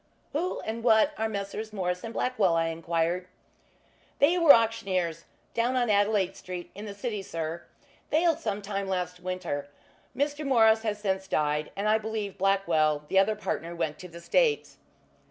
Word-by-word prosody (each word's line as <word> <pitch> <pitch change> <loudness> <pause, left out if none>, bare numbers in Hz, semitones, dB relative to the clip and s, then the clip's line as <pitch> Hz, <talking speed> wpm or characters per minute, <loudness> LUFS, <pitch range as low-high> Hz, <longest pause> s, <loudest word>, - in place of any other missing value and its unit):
"Who 345 +5 -1
and 225 +1 -5
what 225 +4 +5
are 220 0 0
Messrs. 210 +1 -4
Morris 180 -3 -2
& - - -7
Blackwell?" 210 -11 +1
I 165 0 +1
enquired. 165 +2 -1 0.9
"They 305 +5 +4
were 330 -4 +8
auctioneers, 195 - +2 0.3
down 240 +2 +1
on 245 -3 +2
Adelaide 205 -2 +2
Street, 180 -1 -7
in 205 +2 -8
the 200 -1 -7
city, 210 -1 -3
sir. 165 -2 -5 0.4
Failed 330 0 +2
sometime 200 -2 -3
last 180 -1 -2
winter. 180 -6 -4 0.5
Mr. 290 +2 -1
Morris 225 -5 +4
has 215 -2 -2
since 190 -2 -2
died, 150 -2 0
and 200 +2 -1
I 215 +1 +4
believe 215 -3 -4
Blackwell, 165 -6 +2
the 190 - +4
other 210 +3 +3
partner 170 -5 -4
went 160 -3 -2
to 180 - -8
the 170 -1 -11
States." 470 - +1
200 Hz, 160 wpm, -28 LUFS, 175-220 Hz, 0.9 s, were